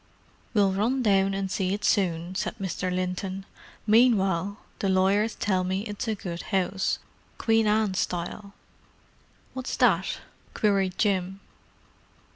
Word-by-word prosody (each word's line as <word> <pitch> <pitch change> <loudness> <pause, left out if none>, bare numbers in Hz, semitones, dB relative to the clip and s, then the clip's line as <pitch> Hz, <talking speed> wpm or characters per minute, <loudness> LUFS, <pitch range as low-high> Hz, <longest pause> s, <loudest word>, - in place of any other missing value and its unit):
"We'll 200 -2 +4
run 235 +7 0
down 195 -2 +3
and 195 -1 -2
see 190 0 0
it 210 - -5
soon," 175 -2 +1
said 205 +3 -3
Mr. 185 -1 -3
Linton. 185 +1 -3 0.4
"Meanwhile, 200 -4 +3 0.2
the 195 - 0
lawyers 195 +4 +2
tell 190 -3 0
me 190 +1 -1
it's 210 +1 -5
a 220 - 0
good 175 -4 -5
house, 190 -1 0 0.4
Queen 225 -1 +2
Anne 210 -2 +2
style——" 185 +3 -3 1.0
"What's 260 -1 -4
that?" - - +3 0.4
queried 195 -3 +1
Jim. 190 -2 0
195 Hz, 125 wpm, -26 LUFS, 185-210 Hz, 1.0 s, We'll